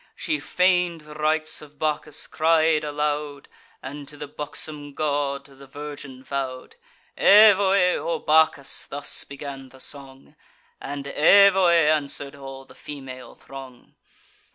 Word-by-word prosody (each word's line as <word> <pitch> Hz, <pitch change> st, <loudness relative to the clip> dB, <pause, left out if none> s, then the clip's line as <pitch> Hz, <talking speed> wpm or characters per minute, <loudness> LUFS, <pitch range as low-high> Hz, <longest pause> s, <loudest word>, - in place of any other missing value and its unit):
She 305 Hz, -2 st, -2 dB
feign'd 180 Hz, -2 st, +1 dB
the 150 Hz, 0 st, -13 dB
rites 155 Hz, +1 st, 0 dB
of 150 Hz, -1 st, -15 dB
Bacchus; 150 Hz, 0 st, -1 dB
cried 160 Hz, -1 st, +2 dB
aloud, 150 Hz, -1 st, -3 dB, 0.4 s
And 140 Hz, +2 st, -8 dB
to 150 Hz, -, -10 dB
the 145 Hz, -, -7 dB
buxom 145 Hz, 0 st, -5 dB
god 140 Hz, -2 st, -2 dB
the 140 Hz, -1 st, -16 dB
virgin 145 Hz, -2 st, -9 dB
vow'd. 135 Hz, -, -5 dB, 0.4 s
"Evoe! 200 Hz, -3 st, +5 dB
O 170 Hz, -, -2 dB
Bacchus!" 155 Hz, -3 st, +1 dB
thus 145 Hz, +1 st, -2 dB
began 140 Hz, -1 st, -9 dB
the 130 Hz, -, -17 dB
song; 135 Hz, -1 st, -8 dB, 0.5 s
And 140 Hz, 0 st, -6 dB
"Evoe!" 190 Hz, +6 st, +5 dB, 0.2 s
answer'd 145 Hz, -1 st, -2 dB
all 135 Hz, -1 st, -10 dB
the -, -, -17 dB
female 135 Hz, -3 st, -10 dB
throng. 135 Hz, -2 st, -13 dB
145 Hz, 125 wpm, -23 LUFS, 140-155 Hz, 0.5 s, Evoe